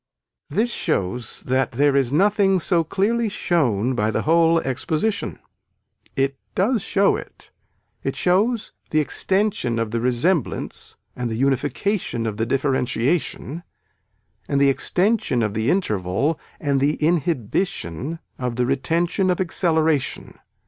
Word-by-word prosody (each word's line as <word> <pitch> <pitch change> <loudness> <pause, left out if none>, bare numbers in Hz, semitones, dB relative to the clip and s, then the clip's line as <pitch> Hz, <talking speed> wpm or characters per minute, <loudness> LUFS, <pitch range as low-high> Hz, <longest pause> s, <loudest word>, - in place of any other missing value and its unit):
This 235 +3 0
shows 105 +5 -2
that 130 0 0
there 140 +3 +3
is 135 -3 +2
nothing 195 +3 +3
so 170 0 +2
clearly 215 +7 0
shown 130 - +1
by 110 -3 0
the - - -1
whole 165 +1 +4
exposition. 155 - -2 0.8
It 135 0 +1 0.2
does 220 +4 +2
show 200 +2 +2
it, - - -10 0.5
it - - -3
shows 210 +6 +1 0.2
the 155 - +2
extension 190 - +1
of 115 -1 -1
the 115 0 -1
resemblance 125 +6 -1 0.2
and 125 -1 -3
the 110 - -3
unification 135 - 0
of 105 -2 -3
the 115 +1 -1
differentiation 135 +3 -1 0.9
and 140 - +1
the 140 0 +5
extension 180 - +2
of 105 -2 -1
the 110 +3 0
interval 135 - 0 0.2
and 140 -3 0
the 145 +2 +2
inhibition 155 - -1 0.2
of 125 -2 -2
the 125 +1 +1
retention 165 +8 0
of 180 - +1
acceleration. 160 -5 0
145 Hz, 130 wpm, -22 LUFS, 125-180 Hz, 0.9 s, the